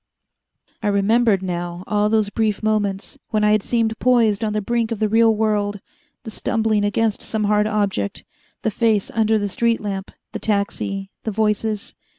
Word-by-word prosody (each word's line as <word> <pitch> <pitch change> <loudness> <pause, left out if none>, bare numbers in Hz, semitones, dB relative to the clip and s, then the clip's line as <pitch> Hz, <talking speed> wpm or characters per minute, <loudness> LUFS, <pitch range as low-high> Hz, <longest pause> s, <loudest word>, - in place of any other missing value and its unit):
I 215 - -1
remembered 205 0 +3
now 175 -1 -4
all 210 0 +1
those 215 -2 +1
brief 215 -2 -1
moments, 205 -2 -1
when 215 -1 0
I 210 - +4
had 215 -1 +3
seemed 225 0 0
poised 230 -4 +3
on 215 - 0
the 215 - 0
brink 230 +2 -1
of 230 - -1
the 215 +1 +1
real 225 +1 +4
world 205 -1 0 0.4
the 220 - -7
stumbling 220 -1 0
against 210 +1 0
some 220 -1 -2
hard 210 0 +2
object, 200 - -1 0.4
the 220 - +1
face 220 -2 +1
under 220 -1 +2
the 205 -1 -1
street 230 +3 +1
lamp, 195 -2 -4 0.2
the - - -5
taxi, 200 -1 -2
the - - -2
voices. 210 0 -1
210 Hz, 170 wpm, -21 LUFS, 205-220 Hz, 0.4 s, I